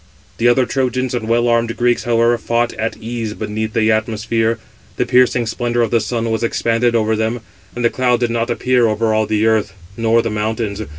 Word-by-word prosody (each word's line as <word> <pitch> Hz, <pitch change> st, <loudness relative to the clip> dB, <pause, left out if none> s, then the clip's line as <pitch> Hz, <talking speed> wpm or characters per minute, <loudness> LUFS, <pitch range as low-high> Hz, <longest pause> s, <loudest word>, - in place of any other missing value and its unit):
The 120 Hz, -, +3 dB
other 125 Hz, +1 st, +4 dB
Trojans 130 Hz, -1 st, -1 dB
and 115 Hz, -3 st, -3 dB
well 120 Hz, +1 st, +2 dB
armed 115 Hz, -1 st, +1 dB
Greeks, 120 Hz, 0 st, +1 dB
however, 120 Hz, 0 st, +3 dB
fought 120 Hz, +1 st, 0 dB
at 110 Hz, +1 st, -3 dB
ease 115 Hz, -1 st, -4 dB
557 -, -, -16 dB
beneath 110 Hz, +1 st, -3 dB
the 110 Hz, 0 st, +2 dB
atmosphere; 115 Hz, +1 st, 0 dB, 0.4 s
the -, -, +1 dB
piercing 125 Hz, -1 st, +3 dB
splendour 120 Hz, +1 st, -1 dB
of 115 Hz, -, -2 dB
the 115 Hz, -, +3 dB
sun 115 Hz, +1 st, -2 dB
was 110 Hz, -, -1 dB
expanded 115 Hz, 0 st, +1 dB
over 110 Hz, -1 st, +1 dB
them, 110 Hz, +2 st, -2 dB, 0.3 s
and 120 Hz, 0 st, -2 dB
a -, -, +5 dB
cloud 125 Hz, -2 st, +1 dB
did 120 Hz, -1 st, +1 dB
not 115 Hz, +1 st, -1 dB
appear 125 Hz, 0 st, +2 dB
over 110 Hz, +1 st, 0 dB
all 110 Hz, 0 st, +1 dB
the 110 Hz, 0 st, +1 dB
earth, 110 Hz, -3 st, +1 dB, 0.2 s
nor 115 Hz, 0 st, +2 dB
the 115 Hz, -, -2 dB
mountains. 110 Hz, 0 st, -2 dB
115 Hz, 210 wpm, -17 LUFS, 110-120 Hz, 0.4 s, a